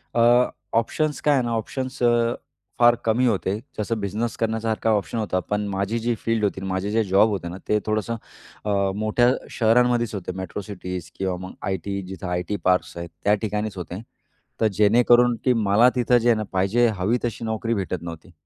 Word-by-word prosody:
अ, 120 +1 +5 0.2
options 150 +6 0
काय 150 - +3
आहे 135 -3 +2
ना? 120 - -2
ऑप्शन्स 130 +4 -4
अ, 120 0 +3 0.5
फार 120 0 +6
कमी 115 +3 +2
होते. 100 -3 0 0.2
जसं 110 +1 -2
बिझनेस 105 +4 -2
करण्यासारखा 110 0 -1
ऑप्शन 105 - -4
होता 105 -4 0
पण 105 0 0
माझी 100 +3 -1
जी 120 +1 0
फील्ड 115 -1 -1
होती, 100 -2 0
माझे 95 +2 -2
जे 110 +1 +2
जॉब 100 +2 +4
होते 95 -5 -3
ना 90 - -7
ते 105 - +2
थोडंसं 110 +2 -1 0.5
अ, 100 -2 +1
मोठ्या 110 +3 +2 0.2
शहरांमध्येच 120 0 +2
होते, 95 -2 -4
मेट्रो 95 +2 -5
सिटीज 90 -3 -6
किंवा 95 -1 -1
मग - - -10
आयटी 95 +1 -3
जिथं 95 0 -7
आयटी 90 +3 -2
पार्क्स 90 0 +1
आहेत 85 0 -6
त्या 105 - +4
ठिकाणीच 105 -1 -2
होते. 90 +2 -6 0.6
तर 110 - +5
जेणेकरून 120 +3 +5
की 130 - +5
मला 110 +5 +6
तिथं 125 0 +3
जे 120 0 +2
आहे 115 - +5
ना 110 - -2
पाहिजे 100 +6 +2
हवी 105 +7 +1
तशी 115 -1 -3
नोकरी 110 +1 -1
भेटत 95 -5 -2
नव्हती. 85 +1 -9
110 Hz, 185 wpm, -23 LUFS, 95-120 Hz, 0.6 s, फार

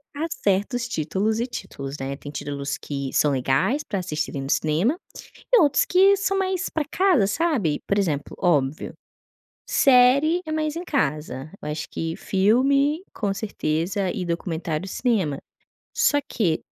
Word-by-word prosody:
há 315 +3 -2
certos 210 +2 0
títulos 205 +4 -1
e 240 - -1
títulos, 140 - -7
né? 135 +1 -3
Tem 145 +1 -9
títulos 140 -1 -4
que 140 -2 -5
são 150 - +3
legais 135 - +1
para 200 -8 -3
assistirem 150 -5 -3
no 135 - -3
cinema 175 - +1 0.5
e - - +8
outros 290 -4 +4
que 390 +2 +5
são 390 0 0
mais 375 -1 -1
para 310 -2 -2
casa, 320 - +3
sabe. 210 - 0
Por 200 - +2
exemplo, 150 -7 -2
óbvio, 150 -5 +1 0.8
série 275 +6 +5
é 310 - -5
mais 310 -1 -1
em 340 - -4
casa, 150 - -2
eu - - -5
acho 150 +1 -4
que 165 0 -3
filme, 275 - +2
com 205 - -1
certeza, 190 -1 -2
e 190 -5 -4
documentário 170 0 -3
cinema, 190 - 0 0.6
só 290 0 +3
que 170 -8 0
195 Hz, 150 wpm, -24 LUFS, -, 0.8 s, e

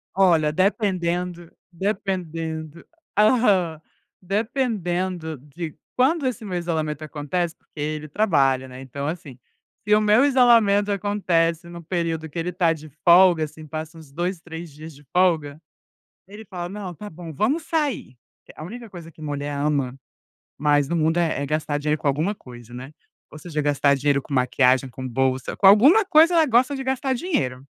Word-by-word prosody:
Olha, 165 -6 +4
dependendo 180 -2 -1 0.2
dependendo 170 -4 -4 0.3
aham, 205 -8 +3 0.4
dependendo 185 - -2
de 150 +4 -8 0.2
quando 275 +4 +2
esse 245 -3 -2
meu 180 -3 -3
isolamento 155 -3 -2
acontece, 160 +3 -3
porque 150 - -17
ele 155 +1 -3
trabalha, 140 -8 +1
né, 130 +1 -10
então, 140 +2 -6
assim, 155 -6 -6 0.5
se 210 - +4
o 215 - +5
meu 215 +5 +4
isolamento 230 -7 +4
acontece 170 -5 0
no 170 0 -9
período 165 -2 -2
que 165 - -5
ele 170 +2 -2
está 175 -2 +1
de 155 0 -11 0.2
folga, 175 -2 +6
assim, 155 +1 -8
passa 160 +1 -6
uns 150 -3 -15
2, 175 +4 -3
3 165 -1 -9
dias 155 +1 -10
de 145 - -17
folga, 160 -5 +1 0.7
ele 210 +3 -11
fala: 175 -3 -6
"Não, 195 -1 -6
está 210 +5 -9
bom, 165 0 -9
vamos 275 - 0
sair". 295 - -2 0.4
A 155 - -8
única 230 +5 -9
coisa 170 -3 -10
que 155 - -20
mulher 145 -1 -4
ama 140 -3 -1 0.6
mais 145 -1 +2
no 170 - -2
mundo 160 +1 +1
é 165 -4 0
é - - -1
gastar 150 0 -1
dinheiro 150 +1 -1
com - - -1
alguma 155 +9 +1
coisa, 120 - -13
né, 130 +4 -9 0.4
ou 155 - -10
seja 155 -2 -3
gastar 145 -1 +2
dinheiro 140 0 +1
com 140 - -9
maquiagem, 130 0 +2
com 130 +1 -8
bolsa, 130 +1 -1
com 195 - +5
alguma 280 - +7
coisa 335 -1 +5
ela 320 -1 +5
gosta 255 +2 +3
de 270 - -5
gastar 265 0 0
dinheiro, 135 - -2
170 Hz, 165 wpm, -23 LUFS, 150-200 Hz, 0.7 s, alguma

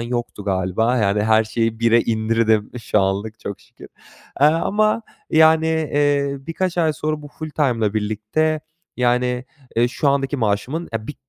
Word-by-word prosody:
yoktu 120 -3 -4
galiba. 95 +5 0
Yani, 105 -1 +1
her 110 0 +4
şeyi 115 +1 -2
1'e 115 0 +4
indirdim 110 -1 +1
şu 105 - +1
anlık 100 +3 -2
çok 100 - -6
şükür. - - -15 0.5
Eee, 145 - +7
ama, 210 +8 +2 0.3
yani, 160 0 +5
eee, 145 -3 +1
birkaç 170 +4 -3
ay 160 -2 +3
sonra 155 +1 -3
bu 145 - -9
full-time 150 -5 -2
ile 105 - -2
birlikte, 110 +9 -1 0.4
yani, 125 0 +1 0.3
eee, 120 +1 +3
şu 140 +3 0
andaki 140 0 0
maaşımın, 125 +9 -1
eee, 110 -1 -4
bir 150 - -6
125 Hz, 155 wpm, -21 LUFS, 110-155 Hz, 0.5 s, Eee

